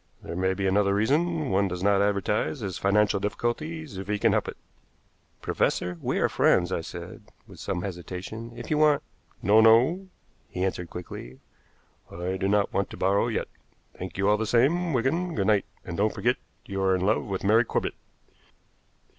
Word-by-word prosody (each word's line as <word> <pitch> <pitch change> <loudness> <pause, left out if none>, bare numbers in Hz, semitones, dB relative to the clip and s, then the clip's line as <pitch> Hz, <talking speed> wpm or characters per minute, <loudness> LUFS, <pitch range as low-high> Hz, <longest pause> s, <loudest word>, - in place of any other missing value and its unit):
"There - - -6
may 95 +1 +1
be 95 0 -2
another 100 +1 +2
reason. 150 +7 +1
One 100 +1 +2
does 90 0 -4
not 100 0 +4
advertise 100 -5 0
his 95 -4 -4
financial 100 +1 +3
difficulties 125 - -3
if 95 - -7
he 105 0 0
can - - +3
help - - +1
it." - - -6 0.9
"Professor, 90 -1 0
we - - -1
are - - +3
friends," 90 0 +2
I 90 - -1
said, - - -8 0.2
with - - -14
some 90 - -3
hesitation. 95 +5 -6
"If 120 - -7
you 150 - +2
want 150 -2 +4 0.2
" - - -35
"No, 105 +4 +6
no," 125 +13 +5 0.4
he 90 - -2
answered 90 -2 -3
quickly, 65 -8 -8 0.7
"I 90 +2 -3
do 95 +1 -1
not 100 0 +1
want 100 - 0
to - - -9
borrow 100 +4 +2
yet. 115 - -2 0.5
Thank 90 -1 -7
you 100 +1 +1
all 105 +1 +4
the 110 0 -2
same, 160 +10 +2
Wigan. 160 +8 0
Good 100 - 0
night. 105 -2 +3 0.2
And 85 - -5
don't 105 +2 +1
forget - - +1 0.3
you 95 0 -4
are 95 -1 +3
in 90 - -2
love 105 +2 +2
with 95 -2 -4
Mary 110 +4 +5
Corbett." - - -2
100 Hz, 190 wpm, -26 LUFS, 95-115 Hz, 0.9 s, No